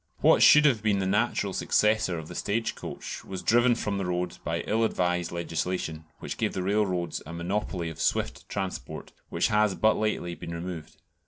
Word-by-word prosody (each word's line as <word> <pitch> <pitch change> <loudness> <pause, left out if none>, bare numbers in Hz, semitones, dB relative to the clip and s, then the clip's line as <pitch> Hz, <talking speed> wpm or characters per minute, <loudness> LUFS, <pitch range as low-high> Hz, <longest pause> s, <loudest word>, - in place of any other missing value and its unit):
What - - +5
should 150 0 +8
have 125 -7 +4
been 105 -2 +2
the 95 - -1
natural 100 0 0
successor 105 -4 +2
of 80 -1 -7
the - - -8
stage 110 +3 -1
coach - - -7
was 95 -1 -7
driven 120 +1 +4
from 105 -3 -2
the 95 - -2
road 90 0 -2
by - - -1
ill 110 +2 0
advised 90 -5 0
legislation, 85 -1 -3
which - - -6
gave - - 0
the 95 - -2
railroads 95 -3 0
a 85 - -7
monopoly 90 0 -2
of 80 - -8
swift - - -1
transport, 95 -2 -5 0.2
which - - +1
has 105 -2 +2
but 110 0 +3
lately 105 -5 -1
been 85 0 -7
removed. 85 -2 -7
95 Hz, 185 wpm, -27 LUFS, 85-105 Hz, 0.2 s, should